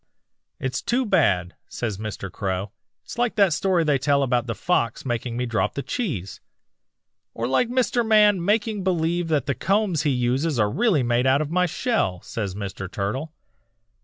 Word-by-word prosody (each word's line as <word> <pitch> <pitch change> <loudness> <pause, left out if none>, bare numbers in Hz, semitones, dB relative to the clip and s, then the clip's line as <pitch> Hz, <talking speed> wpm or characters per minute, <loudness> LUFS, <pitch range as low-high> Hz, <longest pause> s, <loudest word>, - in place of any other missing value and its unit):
"'It's 130 0 -2
too 250 +2 0
bad,' 100 - +2 0.2
says 110 -5 -4
Mr. 105 -3 -5
Crow. 95 0 -3 0.3
'It's - - -9
like 240 -1 +1
that 200 -5 +4
story 180 +1 +1
they 145 -3 +2
tell 140 +1 +2
about 125 -2 0
the 115 - -2
fox 120 -11 0
making 120 -1 -2
me 125 - -1
drop 115 -2 -1
the 140 - -3
cheese.' 120 - -4 0.9
"'Or 115 - -2
like 180 - +2
Mr. 245 -1 +1
Man 210 -4 +4
making 210 +1 0
believe 175 -1 0
that 150 -5 +1
the 140 - 0
combs 195 -1 +1
he 150 - +1
uses 130 +4 0
are 105 -2 +2
really 205 - +2
made 120 +2 +1
out 135 +2 +4
of 150 - -7
my 180 +1 +2
shell,' 165 - -1
says 105 -4 -4
Mr. 95 -2 -6
Turtle. 110 +11 -3
140 Hz, 175 wpm, -24 LUFS, 115-190 Hz, 0.9 s, that